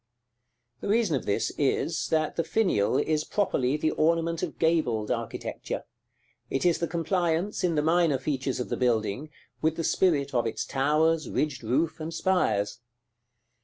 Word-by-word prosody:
The - - -5
reason 210 -6 +2
of 130 - -4
this 100 +3 0
is, 160 +3 0
that 155 -1 0
the 165 - 0
finial 155 - +1
is 155 -1 +1
properly 150 -10 0
the 155 +1 +1
ornament 165 +1 +1
of - - -4
gabled 130 -10 +1
architecture; - - -4 0.7
it 135 - -1
is 175 -2 +3
the 170 - 0
compliance, 170 +2 0
in 175 -3 +2
the 150 - +1
minor 165 -3 +3
features 135 -1 -2
of 125 - -3
the - - -2
building, 120 +3 0 0.3
with 160 0 +1
the 165 - -3
spirit 150 -6 +2
of 120 -2 +1
its 115 - -3
towers, 155 +4 +1
ridged 145 -3 -1
roof, 145 +10 0
and 160 +1 -5
spires. 125 - +1
155 Hz, 160 wpm, -27 LUFS, 135-165 Hz, 0.7 s, is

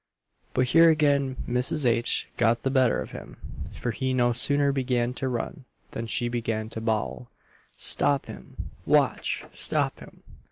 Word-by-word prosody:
But 130 -1 +2
here 165 +3 +6
again 140 -4 +2
Mrs. 125 +4 0
H. 120 0 +1
got 115 -1 +1
the 135 - 0
better 130 -3 +2
of - - -12
him; - - -10 0.3
for 120 - -4
he 130 +5 -2
no 120 -1 +2
sooner 140 +3 +3
began 125 -3 -1
to 130 - -3
run, 130 +4 -4 0.3
than 115 0 -5
she 120 +1 -1
began 115 -2 -3
to 110 - -5
bawl 110 +2 -2 0.5
"Stop 140 -1 +1
him, - - -10 0.2
watch! - - +1
stop - - +3
him!" - - -15
125 Hz, 155 wpm, -26 LUFS, 120-140 Hz, 0.5 s, here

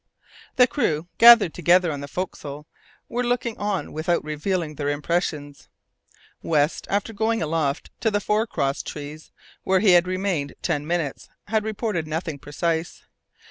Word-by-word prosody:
The 250 - +7
crew, 170 - -1
gathered 230 -7 +8
together 175 0 +3
on 145 - -4
the 140 - -6
forecastle, 150 -3 -6 0.4
were 245 +1 -2
looking 240 -1 -1
on 205 -2 -2
without 165 +2 0
revealing 155 +2 -2
their 145 -1 -2
impressions. 145 -1 -2 0.7
West, 150 -1 0
after 205 +3 -1
going 225 +2 0
aloft 155 -3 -1
to 225 - +2
the 205 -1 0
fore 210 +2 0
cross 140 -9 -1
trees, 150 +1 -8 0.3
where 190 0 +2
he 200 -1 +5
had 175 0 +5
remained 185 -6 -2
ten 145 0 -1
minutes, 165 -5 -2 0.2
had 220 -1 +1
reported 210 -6 -2
nothing 160 -1 -4
precise. 165 +4 -3
170 Hz, 145 wpm, -24 LUFS, 150-205 Hz, 0.7 s, gathered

